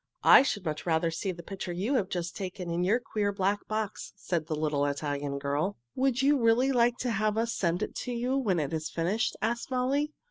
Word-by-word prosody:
"I - - +9
should 205 -8 -2
much 155 +1 -3
rather 165 0 +2
see 185 +4 -2
the 170 -1 -9
picture 190 0 -5
you 195 +10 -1
have 205 -8 +1
just 175 -1 -3
taken 185 -2 -5
in 170 +1 0
your 210 +7 +3
queer, 210 -4 -1
black 200 +1 -1
box," 215 -1 -3
said 170 -5 -2
the 155 - -1
little 150 -2 0
Italian 145 0 -2
girl. 145 +8 -1 0.2
"Would 265 0 +1
you 285 0 +4
really 235 +4 +4
like 240 -1 +3
to 250 - 0
have 215 0 0
us 230 +1 0
send 175 +2 0
it - - -4
to 250 - -4
you 245 +2 -1
when 210 -11 +1
it 145 0 -2
is 155 -1 -2
finished?" 185 +7 -1
asked 235 +3 -1
Molly. 270 +4 0
195 Hz, 220 wpm, -29 LUFS, 165-235 Hz, 0.2 s, I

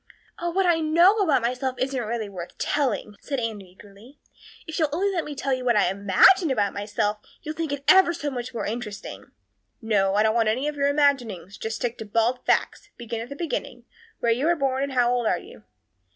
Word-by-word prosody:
"Oh, 345 - -2
what 380 +2 +1
I 340 -2 +3
know 340 +6 +4
about 305 - +2
myself 255 +2 -1
isn't 260 +1 -1
really 225 -1 -3
worth 180 -3 -9
telling," 255 -7 -1
said 275 -2 -3
Anne 225 -3 -3
eagerly. 200 +7 -17 0.5
"If 320 0 -5
you'll 310 -2 +2
only 385 +6 0
let 345 -4 -1
me 295 - -7
tell 270 0 -1
you 255 -1 -2
what 240 -2 +2
I 195 -3 +3
imagine 205 - +4
about 210 -6 0
myself 205 +1 -2 0.2
you'll 305 - -4
think 320 -2 -3
it 285 -1 -4
ever 380 -2 +6
so 295 -4 -4
much 245 -2 -5
more 235 - -4
interesting." 215 -1 -6 0.5
"No, 200 -4 +1
I 210 - +4
don't 220 0 +2
want 225 -2 +2
any 255 +7 -1
of 300 - -3
your 280 -1 +1
imaginings. 250 - 0
Just 220 +2 -5
you - - +3
stick 230 - -21
to 220 - -6
bald 230 +4 0
facts. 410 - 0
Begin 235 -1 -5
at 235 - -8
the 280 - -7
beginning. 335 +2 -4 0.4
Where 235 - +2
were 270 +8 0
you - - +2
born 270 -3 -1
and 280 -1 -2
how 245 -1 +3
old 240 -2 0
are 180 - +2
you?" 105 -9 -14
250 Hz, 225 wpm, -24 LUFS, 215-295 Hz, 0.5 s, ever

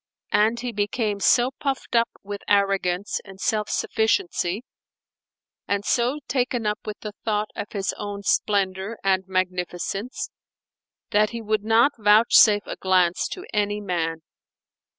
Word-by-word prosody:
And 220 +3 +3
he 245 -1 -3
became 210 0 -1
so 245 +5 +4
puffed 270 -4 -2
up 230 0 +4
with 205 0 -6
arrogance 195 -1 +1
and 195 -1 -13
self 215 +1 0
sufficiency, 220 - 0 1.0
and 200 0 -1
so 245 +4 +1
taken 245 -2 -1
up 210 0 0
with 210 -1 -6
the 210 - -5
thought 210 -1 0
of 205 - -6
his 195 -2 -1
own 205 -1 -5
splendour 195 +1 0
and 190 -1 +1
magnificence, 185 +4 -3 0.8
that 210 +1 +3
he 235 -1 -6
would 215 -1 0
not 225 +5 +4
vouchsafe 210 0 +6
a - - -6
glance 180 -2 +2
to 370 - -7
any 205 0 0
man. 165 -5 -2
210 Hz, 135 wpm, -24 LUFS, 195-225 Hz, 1.0 s, vouchsafe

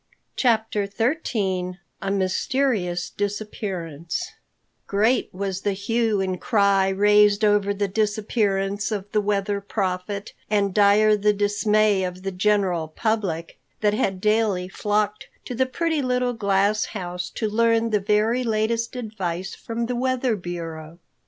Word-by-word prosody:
CHAPTER 220 -4 +1
XIII 200 - -1 0.2
A 195 - -2
MYSTERIOUS 190 -2 0
DISAPPEARANCE 200 - -4 0.6
GREAT 220 +6 +2
was 190 0 -3
the 205 - 0
hue 220 +2 0
and 185 -1 -2
cry 200 -3 +3
raised 205 +1 +4
over 205 -1 +3
the 200 0 -1
disappearance 205 -1 0
of 205 -1 -4
the 210 - +2
Weather 200 0 -1
Prophet, 200 0 -3 0.2
and 200 -2 +1
dire 210 +1 +5
the 210 0 +2
dismay 205 0 +2
of 180 0 -5
the 195 - -2
general 185 -4 +1
public, 180 -2 -2 0.2
that 210 -1 +3
had 195 -3 0
daily 210 -3 +1
flocked 210 +2 -1 0.2
to - - -5
the 260 +2 +1
pretty 320 +3 -1
little 250 -1 0
glass 200 -1 +1
house 180 -1 -4
to 220 - -1
learn 230 +1 +2
the 210 - +3
very 210 +5 +1
latest 230 +1 0
advice 195 -6 -4
from 235 +1 -4
the 250 +1 -2
weather 255 -1 0
bureau. 165 -3 -7
205 Hz, 135 wpm, -23 LUFS, 190-220 Hz, 0.6 s, dire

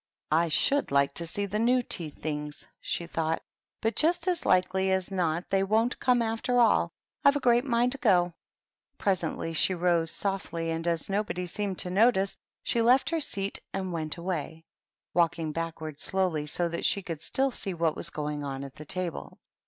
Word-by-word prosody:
" - - -48
I 165 +2 +3
should 280 - +2
like 140 0 +3
to 170 +2 0
see 200 +5 -2
the 205 +2 -2
new 245 +2 +3
tea 170 -8 -2
things," 150 0 -5
she 170 - -3
thought; 165 -1 -2 0.2
" - - -62
but 225 +1 +1
just 340 +3 +2
as 355 -2 0
likely 190 +1 +3
as 190 0 0
not 175 -2 -1
they 195 0 +3
won't 220 +5 +1
come, 250 -2 +3
after 225 +2 -1
all. 235 - +4 0.3
I've 280 - +6
a - - +1
great 240 -1 +3
mind 240 -1 +2
to 275 - -2
go." 180 -7 +3 0.6
Presently 170 -4 -1
she 185 +3 +3
rose 170 -2 +2
softly, 170 -4 -2
and, 165 +1 -3
as 165 -2 0
nobody 195 -2 -1
seemed 195 +1 -2
to 180 - -4
notice, 200 -1 +3 0.3
she 235 - +1
left 250 +7 +4
her 330 - +1
seat 200 -9 -1 0.2
and 190 -2 -3
went 155 0 -3
away, 165 -2 -4 0.5
walk 170 -2 +3
ing 160 -2 -3
backward 160 -2 -5
slowly, 180 -6 0
so 175 +3 +1
that 170 0 -4
she 200 - +1
could 165 -4 -5
still 270 +10 +1
see 195 -6 -4
what 165 -2 +1
was - - -3
going 150 -1 -4
on 135 -1 -4
at 135 -1 -8
the 155 - -9
table. 180 +1 -2
THE - - -13
TEA - - -18
TABLE. - - -39
180 Hz, 205 wpm, -28 LUFS, 165-220 Hz, 0.6 s, I've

